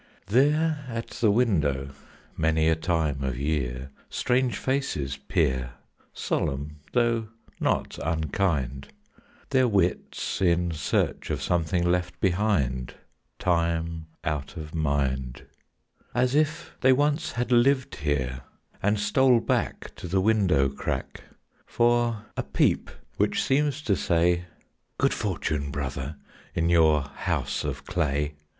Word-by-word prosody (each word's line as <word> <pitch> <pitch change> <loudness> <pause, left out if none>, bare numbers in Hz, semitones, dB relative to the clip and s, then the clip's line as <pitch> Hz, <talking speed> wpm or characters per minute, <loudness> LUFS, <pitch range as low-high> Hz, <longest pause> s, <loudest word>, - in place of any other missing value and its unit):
There 150 +5 +3
at 115 -1 -5
the 110 - +2
window 75 - +2 0.5
many 80 0 +2
a 80 - +4
time 80 -4 0
of 65 -2 -2
year, 70 -2 -2 0.2
Strange 125 -1 +1
faces 75 - -1
peer, 65 -2 0 0.4
Solemn 70 +2 -2 0.2
though 115 -2 +2 0.3
not - - 0
unkind, 75 -4 -1 0.6
Their 130 -2 +4
wits 95 -4 0
in 85 -1 +2
search 80 -2 -1
of - - -1
something 85 +1 0
left 90 0 0
behind 90 - 0 0.4
Time 85 -2 0 0.2
out 75 +1 -3
of 75 -1 -7
mind; 70 -5 -1 0.7
As 125 +1 +2
if 155 +3 0
they 130 - +6
once 145 +3 +1
had 125 0 -2
lived 130 +2 +3
here, 65 -3 -1 0.4
and 105 +1 +2
stole 125 +3 +4
back - - -1
To - - -6
the 95 +3 +1
window 95 -9 +3
crack 70 - -4 0.4
For 120 -2 +2
a - - 0
peep - - +1 0.3
which - - +1
seems 145 +1 +1
to 100 - +2
say, 85 0 +2 0.5
"Good - - +2
fortune, 70 -2 -2
brother, 70 +1 -4 0.4
in 85 0 +1
your 80 -3 +5
house 70 - -2
of - - -4
clay!" 75 -3 0
85 Hz, 120 wpm, -26 LUFS, 70-115 Hz, 0.7 s, they